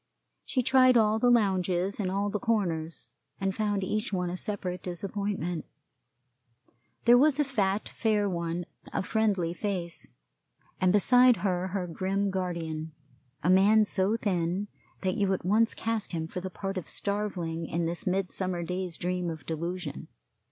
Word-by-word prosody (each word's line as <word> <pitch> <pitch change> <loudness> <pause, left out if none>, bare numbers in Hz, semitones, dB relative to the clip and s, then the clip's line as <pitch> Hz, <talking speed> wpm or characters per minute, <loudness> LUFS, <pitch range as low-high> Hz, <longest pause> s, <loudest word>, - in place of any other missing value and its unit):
She 255 - 0
tried 255 0 +6
all 220 -1 +3
the 245 - +4
lounges 190 -4 +2
and 190 -3 0
all 200 +2 -1
the 210 - -1
corners, 175 -9 -1 0.3
and 195 0 0
found 205 -1 -1
each 215 +3 -1
one 180 -2 -1
a - - -3
separate 185 -3 -4
disappointment. 185 -2 -3 1.4
There 240 +1 +7
was 295 +1 +4
a - - +5
fat, 210 -7 0
fair 210 -2 +1
one, 170 -1 -2 0.3
of - - -2
friendly 200 -7 +1
face, 175 -3 -3 0.7
and 185 -1 +3
beside 245 +4 +6
her 180 -1 0
her 190 -1 -2
grim 190 +3 -1
guardian, 165 -4 -3 0.5
a 170 - +2
man 210 +3 +6
so 200 +2 +1
thin 190 -1 -1 0.3
that 185 +3 0
you 200 -2 +2
at - - -8
once 220 +4 +3
cast 225 -4 -2
him 160 -1 -2
for 180 +3 -6
the 190 - -4
part 195 +1 -4
of 175 - -10
Starveling 180 -6 -2
in 170 0 -1
this 170 +2 -2
Midsummer 185 -1 0
Day's 180 0 -3
Dream 180 0 -2
of 160 -1 -7
Delusion. 165 -1 -4
190 Hz, 155 wpm, -28 LUFS, 175-210 Hz, 1.4 s, There